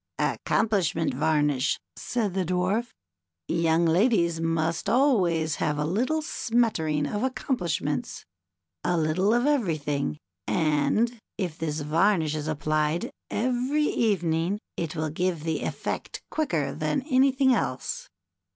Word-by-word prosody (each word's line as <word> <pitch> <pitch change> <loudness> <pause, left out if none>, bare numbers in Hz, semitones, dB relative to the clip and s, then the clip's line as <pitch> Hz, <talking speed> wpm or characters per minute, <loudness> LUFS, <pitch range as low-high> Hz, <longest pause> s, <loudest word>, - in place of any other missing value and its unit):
'^Accomplishment 185 -7 +1
Varnish," 150 -3 +1 0.2
said 220 -6 -2
the 190 0 0
Dwarf. 185 +6 0 0.6
"Young 165 0 +2
ladies 170 -1 +3
must 165 +2 0
always 185 - +2
have 150 - 0
a 150 - 0
little 255 - 0
smattering 220 - 0
of 205 +8 -2
accom 260 +1 -1
plishments, 150 - -2 0.6
a 175 - +1
little 165 +6 +2
of 240 +2 +2
everything, 155 - 0 0.3
and 170 +10 +1 0.2
if 175 -6 -3
this 155 -1 -2
varnish 160 +1 +2
is 155 -1 -3
applied 155 +1 0 0.2
every 255 +5 0
evening, 180 - +1 0.2
it 165 -1 -3
will 155 -1 -2
give 175 -1 -1
the 160 -1 -1
effect - - -4
quicker 175 - 0
than 155 - -1
anything 265 -1 +3
else." 130 - -2
170 Hz, 120 wpm, -26 LUFS, 155-230 Hz, 0.6 s, ladies